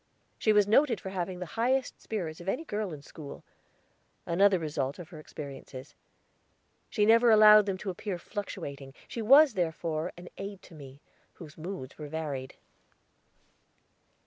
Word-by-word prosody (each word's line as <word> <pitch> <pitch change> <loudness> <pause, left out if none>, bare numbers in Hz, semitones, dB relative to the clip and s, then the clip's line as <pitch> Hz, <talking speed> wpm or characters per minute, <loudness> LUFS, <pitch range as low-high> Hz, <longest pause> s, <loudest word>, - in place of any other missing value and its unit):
She 215 - +3
was 210 -1 +4
noted 230 0 +3
for 190 - -7
having 185 -1 -3
the 180 - -5 0.2
highest 260 +2 0
spirits 175 -7 -4
of 180 - -4
any 290 +10 -2
girl 210 - -3
in 145 -2 -9
school 145 -1 -10 0.8
another 190 +3 +4
result 145 -4 -3
of 175 -3 -10
her 165 -4 -10
experiences. 135 -3 -9 1.0
She 210 -3 +2
never 230 +2 +6
allowed 215 -1 +8
them 195 -1 -1
to 190 0 -4
appear 185 +1 -5
fluctuating; 140 -9 -7
she 230 - -5
was, 275 +4 +7
therefore, 165 -2 -2
an 180 0 -10
aid 195 -1 -7
to - - -15
me, 140 -2 -12 0.3
whose 155 -4 -12
moods 165 -5 -7
varied. 145 -3 -5
180 Hz, 145 wpm, -29 LUFS, 155-210 Hz, 1.0 s, allowed